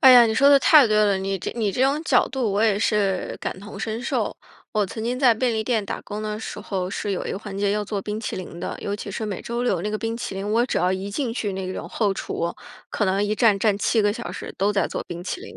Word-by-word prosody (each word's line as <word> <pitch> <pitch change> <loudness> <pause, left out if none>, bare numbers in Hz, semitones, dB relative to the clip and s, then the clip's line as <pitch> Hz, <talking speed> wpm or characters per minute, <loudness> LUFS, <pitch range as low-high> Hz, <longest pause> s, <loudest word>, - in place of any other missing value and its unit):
哎 265 - +9
呀， 240 -1 +9
你 220 - 0
说 280 +3 +5
的 280 - +8
太 290 0 +7
对 215 -1 +2
了， 210 -2 +4
你 195 0 -2
这 185 - -4
你 220 -4 0
这 250 - 0
种 280 +3 +2
角 255 -5 +4
度 255 -5 -1
我 205 +2 +2
也 210 -3 +3
是 200 -4 0
感 - - -4
同 200 0 -9
身 220 +2 -3
受。 265 - -1 0.4
我 210 -2 +1
曾 220 +4 -6
经 245 +2 -1
在 250 -4 +5
便 240 +2 0
利 220 -1 -1
店 225 -5 0
打 - - -4
工 210 +1 -6
的 215 0 -3
时 - - -6
候 185 -2 -3
是 200 +1 -3
有 190 - -2
一 - - -3
个 - - -3
环 205 -2 -7
节 200 0 +1
要 210 0 -1
做 205 -1 -3
冰 210 +2 -4
淇 - - -4
淋 175 -2 -7
的， - - -4
尤 200 - -2
其 205 - -6
是 215 +3 -3
每 200 -3 -4
周 235 +1 -2
六 185 -8 +1
那 210 - -2
个 215 - -2
冰 225 0 -2
淇 235 - -5
淋， 195 +2 -3
我 235 +2 +3
只 250 - -1
要 180 +2 +2
一 190 +2 -3
进 235 +1 -2
去 210 -5 -2
那 190 -1 -4
个 185 - -4
种 - - -6
后 205 -4 0
厨， 170 -2 -3 0.3
可 210 - -1
能 195 +1 +1
一 210 +1 0
站 215 -3 +4
站 205 0 +2
7 220 +2 +2
个 205 -1 +2
小 240 +1 -6
时 - - -7
都 200 +2 +2
在 200 - +1
做 - - -4
冰 175 0 -6
淇 365 - -4
淋。 435 - -10
210 Hz, 315 characters per minute, -23 LUFS, 195-230 Hz, 0.4 s, 哎